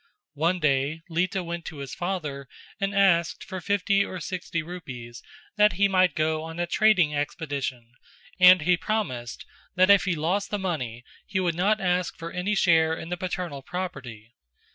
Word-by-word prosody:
One 165 +5 0
day 150 +1 0
Lita 180 +3 0
went 170 0 -5
to 155 - -7
his 140 -2 -7
father 155 -7 -4 0.3
and 195 0 -1
asked 175 -4 +3
for 185 -2 -7
fifty 200 +1 +2
or 185 - -6
sixty 170 -1 -4
rupees 130 -9 -8 0.4
that 210 -1 +5
he 200 +3 +3
might 185 -4 +3
go 155 0 0
on 165 +1 -7
a 175 - 0
trading 180 -4 +3
expedition 140 -5 -4 0.5
and 180 -2 +8
he 180 +2 +3
promised 150 - -3 0.3
that 185 +2 +5
if 200 -1 +5
he 185 -3 0
lost 180 +6 -1
the 205 - -1
money 130 - -4 0.2
he 190 -1 -1
would 175 -2 +1
not 200 +6 +1
ask 180 -2 0
for 165 0 -7
any 190 +4 -1
share 160 -4 +3
in 165 - -8
the 180 - -1
paternal 175 -5 -4
property. 130 -11 -7
175 Hz, 170 wpm, -26 LUFS, 150-185 Hz, 0.5 s, and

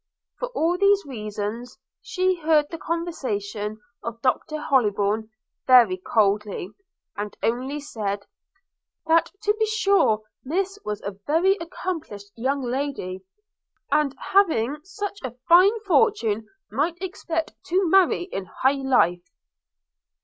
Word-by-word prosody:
For - - -2
all 345 0 +1
these 400 -1 +4
reasons 220 0 -5 0.2
she 370 -6 +1
heard 310 -1 +4
the 330 - -6
conversation 215 - -3 0.2
of 230 0 -6
Doctor 270 +4 0
Hollybourn 215 -6 +1 0.4
very 245 -7 +7
coldly, 205 -1 0 0.4
and 205 0 -5
only 260 +5 -1
said, 205 -8 -4 0.8
'that 330 +1 +3
to 415 - +3
be 440 - +2
sure 400 - +2 0.2
Miss 385 +8 -2
was 210 0 -4
a 200 -1 -6
very 345 +6 +3
accomplished 320 - -6
young 265 +4 -1
lady; 245 -8 -3 0.7
and, 290 -2 +2
having 300 - +2
such 400 +2 -5
a 250 -2 -5
fine 380 +6 +6
fortune, 360 - +2 0.2
might 330 +5 -1
expect 335 -3 -3
to 370 +1 +1
marry 370 0 +4
in 195 - -5
high 270 +8 0
life.' 180 -9 +2
275 Hz, 120 wpm, -24 LUFS, 215-350 Hz, 0.8 s, very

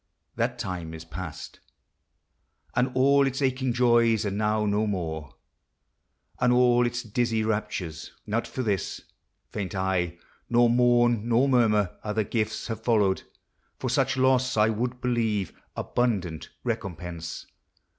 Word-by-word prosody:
— - - -50
That 120 +1 -1
time 90 -7 -5
is 80 +1 -9
past, 85 -1 -8 1.2
And 125 +2 +2
all 140 +1 +5
its 135 0 -2
aching 130 -2 +1
joys 115 -2 +3
are 100 - -1
now 105 +1 0
no 105 +1 +1
more, 80 -6 -4 1.0
And 125 0 +3
all 125 0 +4
its 120 0 -3
dizzy 115 0 0
raptures. 95 -7 -3
Not 115 +3 -1
for 130 - -4
this 100 -6 -2 0.5
Faint 100 0 -4
I, 90 -3 0 0.3
nor 120 0 +4
mourn 120 -2 +3
nor 120 +4 +4
murmur; 105 -7 +2
other 105 +1 0
gifts 110 +1 -2
Have 115 -2 -4
followed; 105 -5 +2 0.6
for - - -2
such 130 -1 +1
loss, 130 -2 +3
I 105 +1 +5
would 120 +3 -2
believe, 110 -6 0 0.2
Abundant 95 -10 -1
recompense. 90 -8 -4
110 Hz, 135 wpm, -26 LUFS, 95-125 Hz, 1.2 s, all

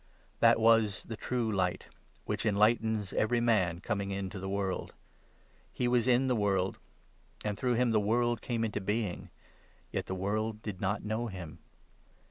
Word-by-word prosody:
That - - +5
was 115 -3 +4
the 115 - -6
True 115 0 -1
Light 95 -3 0 0.4
which - - -2
enlightens 110 -1 +2
every 120 +2 +2
man 95 -8 +2
coming 100 -2 -2
9 100 - -2
into 95 0 -5
the 95 +1 -4
world. 95 -1 -2 0.8
He 125 - -1
was 120 -1 +2
in 125 +1 +4
the 130 -1 +2
world; 95 -3 0 0.6
10 105 - -1
And - - -5
through 125 -2 +1
him 120 0 +2
the 110 - +4
world 120 +2 +1
came 115 -2 -1
into 105 -2 -2
being 105 -1 -2 0.3
— - - -33
Yet - - -3
the 95 - -2
world 105 +3 -2
did 100 -4 -6
not 100 +2 -1
know 110 +3 -1
him. 90 -7 -8
105 Hz, 175 wpm, -31 LUFS, 100-115 Hz, 0.8 s, That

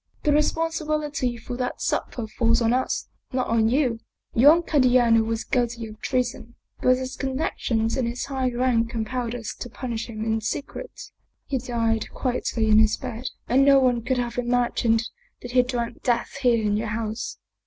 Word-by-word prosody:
" - - -38
The 300 - +3
responsibility 300 -4 0
for 240 +1 -6
that 250 -1 -3
supper 235 - -2
falls 230 +1 +1
on 230 0 +2
us, 255 +1 -1 0.2
not 255 -1 0
on 225 -1 +2
you. 250 -3 +1 0.3
Young 295 +8 +6
Candiano 250 -6 +4
was 225 0 -2
guilty 240 -2 -1
of 215 0 -11
treason, 245 -2 -2 0.3
but 255 0 +4
his 260 0 -5
connections 255 -4 -1
and 255 -3 0
his 240 +1 -3
high 265 -2 -1
rank 240 -2 +1
compelled 235 +1 -3
us 225 -3 -5
to 245 - -6
punish 235 -3 -4
him 220 -2 -5
in 220 0 0
secret. 285 - -5 0.5
He 270 -2 -1
died 230 -3 -1
quietly 245 -3 -1
in 215 0 +6
his 220 -1 +3
bed, 250 -1 -6 0.2
and 265 +3 +4
no 275 0 +7
one 250 -2 +2
could 255 +2 0
have 240 0 -2
imagined 240 -2 +1 0.4
that 245 - -6
he 250 0 +5
drank 245 -2 -3
death 240 +2 0
here 235 -4 +3
in 205 0 +2
your 220 +1 -2
house. 220 +1 -3
245 Hz, 175 wpm, -24 LUFS, 230-255 Hz, 0.5 s, no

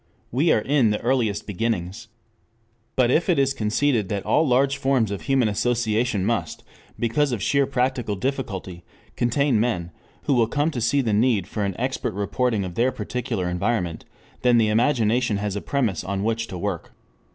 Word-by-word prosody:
We 145 +7 +2
are - - +4
in 135 -2 +2
the 105 - 0
earliest 120 -5 0
beginnings. 105 +1 -3 0.9
But 125 -2 +3
if 165 +7 +2
it 175 - +3
is 135 0 +2
conceded 110 -2 0
that 100 -2 -3
all 155 0 +3
large 135 +2 +2
forms 130 -6 +1
of 100 - -4
human 135 -4 +2
association 110 -1 0
must, 115 +2 -2 0.3
because 130 +5 +1
of 120 - -2
sheer 140 -1 +2
practical 125 -4 -1
difficulty, 95 -7 -4 0.3
contain 125 0 +1
men 90 -7 -1 0.3
who - - +1
will 120 -3 +3
come 145 +6 0
to 125 -6 -4
see 120 +5 +2
the 115 -5 0
need 110 -3 +2
for 105 - -4
an 100 -2 -2
expert 125 -4 -2
reporting 105 +1 0
of 90 - -6
their 120 +7 +2
particular 115 -4 -3
environment, 90 -1 -1 0.4
then 125 -1 +4
the 110 -2 +3
imagination 115 -1 +2
has 100 -1 -3
a 100 - -3
premise 120 - -1
on 100 0 -3
which 115 +1 -1
to 90 - -6
work. 90 -2 -4
115 Hz, 175 wpm, -23 LUFS, 105-130 Hz, 0.9 s, are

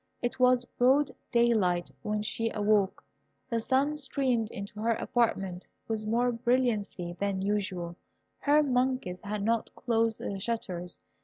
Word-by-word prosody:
It 240 +1 -2
was 250 -1 +5
broad 265 +4 +3 0.2
daylight 215 -8 +2
when 210 0 -1
she 225 +1 -1
awoke. 205 -2 +2 0.5
The 230 - +1
sun 270 +6 +1
streamed 260 -5 0
into 200 0 -7
her 230 +2 +2
apartment 195 -8 -1 0.2
with 215 -1 -2
more 240 +3 +2
brilliancy 230 -7 0
than 200 -1 -1
usual: 190 -4 -1 0.4
her 300 +1 +4
monkeys 250 -8 0
had 205 0 -3
not 230 +1 +1
closed 230 -2 +1
the 195 - -4
shutters. 185 -5 -4
225 Hz, 135 wpm, -29 LUFS, 200-245 Hz, 0.5 s, was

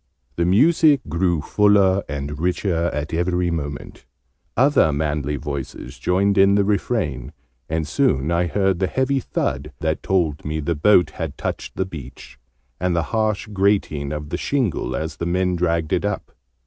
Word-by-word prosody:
The 85 - +1
music 150 - +4
grew 85 0 +1
fuller 100 0 +3
and 70 +1 -4
richer 90 0 0
at 75 -2 -4
every 90 +1 0
moment: 75 -3 -6 0.5
other 130 - +4
manly 75 0 -1
voices 70 -2 -6
joined 100 +2 +2
in 100 +1 +6
the 100 - +3
refrain: 90 - -1 0.4
and 80 -1 -1
soon 70 +1 +1
I 85 +1 +1
heard 95 0 +1
the 95 - +1
heavy 130 +6 0
thud 70 - -3
that 80 0 -1
told 85 -6 0
me 75 +1 -3
the 80 +3 -1
boat 85 0 +4
had - - -5
touched - - -4
the 95 - -1
beach, 75 -11 -10 0.4
and 90 -1 0
the 85 - +1
harsh 110 -2 0
grating 95 -8 +1
of 75 -1 -5
the 85 - -2
shingle 130 - -1
as 80 -1 -4
the 85 - -3
men 90 +1 +1
dragged 85 -2 0
it - - +1
up. - - -3
85 Hz, 160 wpm, -21 LUFS, 75-100 Hz, 0.5 s, in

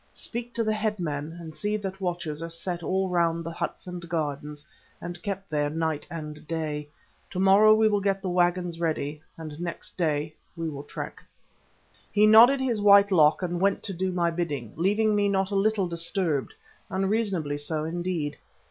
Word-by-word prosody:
Speak 240 0 -4
to 230 - +1
the 215 0 +1
headmen, 170 -8 -2
and 160 -2 -8
see 210 +5 -1
that 195 -1 -6
watchers 170 -4 -3
are 165 - -4
set 170 +1 -4
all 190 +3 0
round 170 -2 +1
the 165 - -5
huts - - -4
and 175 -2 -7
gardens, 150 -2 -3 0.3
and 175 0 -7
kept 195 0 -4
there 145 -2 0
night 160 -1 -2
and 150 -2 -7
day. 150 -3 -3 0.4
To 185 - -4
morrow 200 +3 +7
we 220 0 +4
will 205 -1 +1
get 195 0 +1
the 190 - -5
waggons 175 -1 +1
ready, 155 -3 -2 0.2
and 155 -2 -8
next 175 -1 -5
day 155 -2 0 0.2
we 165 -1 -3
will 140 -2 -6
trek." - - -7 0.9
He 210 +1 +5
nodded 230 +6 +8
his 245 -5 0
white 200 0 +7
lock 155 -1 +4
and 175 0 -2
went 200 0 +2
to 195 - -2
do 185 +1 -1
my 170 -1 +1
bidding, 150 -10 -3
leaving 210 +6 +2
me 205 -1 +2
not 195 0 0
a - - -1
little 200 -1 +2
disturbed—unreasonably 175 +1 -2
so, 155 +1 -2
indeed. 165 -2 -3
175 Hz, 175 wpm, -27 LUFS, 155-200 Hz, 0.9 s, nodded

